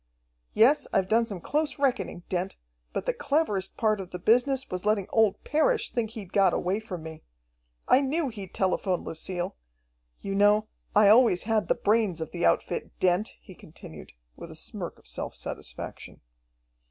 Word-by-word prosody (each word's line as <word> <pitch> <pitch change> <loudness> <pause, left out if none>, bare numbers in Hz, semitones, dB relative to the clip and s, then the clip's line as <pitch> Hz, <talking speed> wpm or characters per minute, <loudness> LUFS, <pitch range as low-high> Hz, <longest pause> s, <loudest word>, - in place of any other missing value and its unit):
"Yes, 265 +7 +5
I've 190 -1 +2
done 230 +3 +2
some 200 -4 -6
close 300 - -1
reckoning, 265 -10 -1
Dent, 185 +1 -3 0.3
but - - -3
the - - +1
cleverest 210 -11 -1
part 215 -3 +1
of 185 - -9
the 180 - -6
business 250 +7 +2
was 185 0 -3
letting 210 -2 +1
old 220 -3 +2
Parrish 440 +11 +1
think 230 -3 -1
he'd 210 -5 -9
got 195 -2 +4
away 190 +4 0
from 185 -7 -7
me. 160 -1 -9 0.7
I 260 - +5
knew 285 +2 0
he'd 200 -5 -8
telephone 185 -1 0
Lucille. 175 +3 -4 0.6
You 195 - -4
know, 205 +2 +4 0.3
I 205 -1 +7
always 220 -5 +5
had 215 -4 0
the - - +2
brains 210 -5 +1
of 160 - -5
the - - -4
outfit, 85 - -1
Dent," 185 +4 +1
he 190 - -13
continued, 150 - -13 0.2
with - - -10
a - - -10
smirk - - -6
of - - -23
self - - -5
satisfaction. - - -7
205 Hz, 170 wpm, -27 LUFS, 185-235 Hz, 0.7 s, I